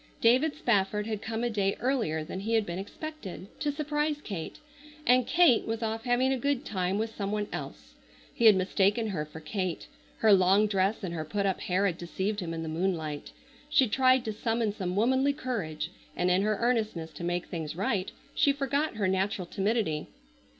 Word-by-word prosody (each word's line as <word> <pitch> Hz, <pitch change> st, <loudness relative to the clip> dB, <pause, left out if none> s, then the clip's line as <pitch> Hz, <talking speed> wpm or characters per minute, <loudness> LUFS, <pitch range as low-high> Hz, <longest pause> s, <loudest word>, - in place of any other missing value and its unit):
David 255 Hz, +7 st, +4 dB
Spafford 210 Hz, -6 st, +1 dB
had 215 Hz, -2 st, -3 dB
come 225 Hz, +1 st, -3 dB
a 240 Hz, -, +1 dB
day 200 Hz, -2 st, +1 dB
earlier 230 Hz, -, 0 dB
than 185 Hz, -, -6 dB
he 225 Hz, +4 st, 0 dB
had 220 Hz, -2 st, +2 dB
been 175 Hz, 0 st, -4 dB
expected, 205 Hz, -, -7 dB
to 295 Hz, -, 0 dB
surprise 295 Hz, 0 st, -1 dB
Kate, 195 Hz, -, -6 dB, 0.5 s
and 250 Hz, 0 st, +4 dB
Kate 335 Hz, -9 st, +4 dB
was 225 Hz, +1 st, -2 dB
off 225 Hz, +2 st, -3 dB
having 255 Hz, +2 st, +2 dB
a 260 Hz, -, -2 dB
good 280 Hz, +1 st, 0 dB
time 185 Hz, -1 st, -1 dB
with 220 Hz, +1 st, -2 dB
some 200 Hz, -1 st, -3 dB
one 210 Hz, 0 st, 0 dB
else. -, -, -7 dB, 0.4 s
He 235 Hz, -, 0 dB
had 215 Hz, -2 st, +9 dB
mistaken 200 Hz, +4 st, +2 dB
her 160 Hz, -6 st, -2 dB
for 155 Hz, +1 st, -10 dB
Kate. 180 Hz, +2 st, -3 dB, 0.3 s
Her 220 Hz, -2 st, +5 dB
long 195 Hz, +2 st, +5 dB
dress 200 Hz, +1 st, 0 dB
and 175 Hz, -3 st, -3 dB
her 160 Hz, -2 st, -3 dB
put 200 Hz, +6 st, -2 dB
up 190 Hz, -2 st, 0 dB
hair 185 Hz, +2 st, +1 dB
had 180 Hz, -3 st, 0 dB
deceived 190 Hz, +4 st, -2 dB
him 175 Hz, -4 st, -4 dB
in 165 Hz, 0 st, -4 dB
the -, -, -5 dB
moonlight. 160 Hz, -3 st, -2 dB, 0.4 s
She 265 Hz, -3 st, +4 dB
tried 255 Hz, +2 st, +3 dB
to 220 Hz, -, -2 dB
summon 225 Hz, 0 st, 0 dB
some 185 Hz, -3 st, -3 dB
womanly 260 Hz, +6 st, +3 dB
courage, 175 Hz, -, -3 dB, 0.2 s
and 180 Hz, 0 st, +1 dB
in 180 Hz, +2 st, +3 dB
her 210 Hz, 0 st, +1 dB
earnestness 220 Hz, -9 st, 0 dB
to -, -, -9 dB
make 175 Hz, 0 st, -1 dB
things 160 Hz, -3 st, -5 dB
right 195 Hz, 0 st, -1 dB, 0.2 s
she 285 Hz, -, +4 dB
forgot 280 Hz, +1 st, -1 dB
her 205 Hz, -3 st, 0 dB
natural 190 Hz, 0 st, 0 dB
timidity. 195 Hz, -5 st, -1 dB
210 Hz, 195 wpm, -29 LUFS, 185-240 Hz, 0.5 s, had